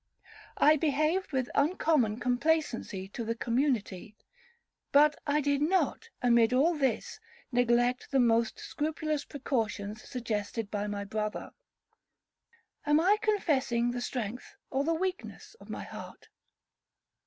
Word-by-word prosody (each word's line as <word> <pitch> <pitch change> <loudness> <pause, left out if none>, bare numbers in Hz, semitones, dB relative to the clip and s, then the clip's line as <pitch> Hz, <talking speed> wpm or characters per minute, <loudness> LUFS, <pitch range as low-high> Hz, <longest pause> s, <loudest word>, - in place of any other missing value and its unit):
I 305 +1 +6
behaved 310 +5 0
with 260 -3 -1
uncommon 285 - +2
complacency 250 -6 0
to 235 - -5
the 230 +1 -2
community. 230 -5 -1 0.7
But 295 +1 +5
I 295 +1 +2
did 285 0 +1
not, 375 +7 +1
amid 235 -1 +4
all 295 +7 +4
this, 270 - -1 0.3
neglect 245 0 +2
the 270 - +2
most 230 -2 +2
scrupulous 305 -1 -3
precautions 220 -6 -3
suggested 225 -3 -4
by 205 0 -2
my 205 -1 -3
brother. 210 +1 -4 1.3
Am 295 +1 +3
I 390 +6 +4
confessing 270 - +1
the 245 0 -4
strength 240 -1 -5 0.2
or 270 +1 +1
the 330 +2 +1
weakness 375 +5 -4
of - - -15
my - - -5
heart? - - -10
255 Hz, 120 wpm, -30 LUFS, 230-300 Hz, 1.3 s, I